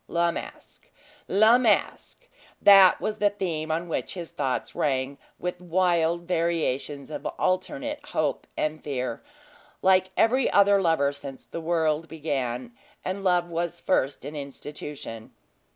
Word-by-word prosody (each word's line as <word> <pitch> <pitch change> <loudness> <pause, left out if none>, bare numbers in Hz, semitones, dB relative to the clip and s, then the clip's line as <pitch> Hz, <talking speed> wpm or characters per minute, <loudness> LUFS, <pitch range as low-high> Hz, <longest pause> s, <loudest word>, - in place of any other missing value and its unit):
La 170 0 +1
Masque! - - -9 0.4
La 220 +5 +5
Masque! 250 - 0 0.3
that 195 -2 +8
was 215 0 -3
the 205 - +4
theme 170 -6 -3
on 165 +2 -1
which 165 - -3
his 170 -3 -6
thoughts 130 -1 -2
rang, 135 -1 -1 0.2
with 180 0 -4
wild 175 -1 +1
variations 160 -5 -1
of - - -5
alternate 285 +11 -1
hope 150 -3 -2
and 155 0 -2
fear, 130 -3 -3 0.6
like 185 0 +4
every 255 +3 +3
other 200 0 +5
lover 160 -5 +2
since 140 -1 -9
the 170 - -6
world 160 -1 0
began, 130 -6 -3 0.3
and 190 +1 -3
love 175 -2 +2
was 170 +1 -2
first 140 -6 0
an 150 - -6
institution. 140 -4 -7
170 Hz, 135 wpm, -26 LUFS, 145-185 Hz, 0.6 s, that